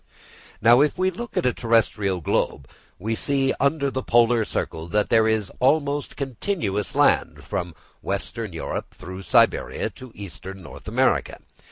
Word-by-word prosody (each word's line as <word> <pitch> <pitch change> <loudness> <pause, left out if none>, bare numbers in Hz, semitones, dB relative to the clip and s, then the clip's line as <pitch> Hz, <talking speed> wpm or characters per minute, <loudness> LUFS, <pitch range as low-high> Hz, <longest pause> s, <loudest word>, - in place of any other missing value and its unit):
Now, 120 +3 +7
if 150 +4 +2
we 185 +1 +2
look 235 +7 -7
at - - +1
a 125 - +3
terrestrial 105 -5 +1
globe, 70 -3 -1 0.3
we 110 +5 -2
see 135 +3 +1
under 140 0 +1
the 130 +1 -2
Polar 120 -1 +3
Circle 80 -4 -3
that 105 +4 +1
there 110 -1 +5
is 110 -3 0
almost 145 +1 +1
continuous 130 - -2
land - - +2
from 85 -2 -4 0.3
western - - -4
Europe - - -5
through 95 +1 -8
Siberia, 95 - +2
to 130 -2 -12
eastern 95 -1 -9 0.2
America. - - +1
115 Hz, 145 wpm, -24 LUFS, 100-140 Hz, 0.3 s, Now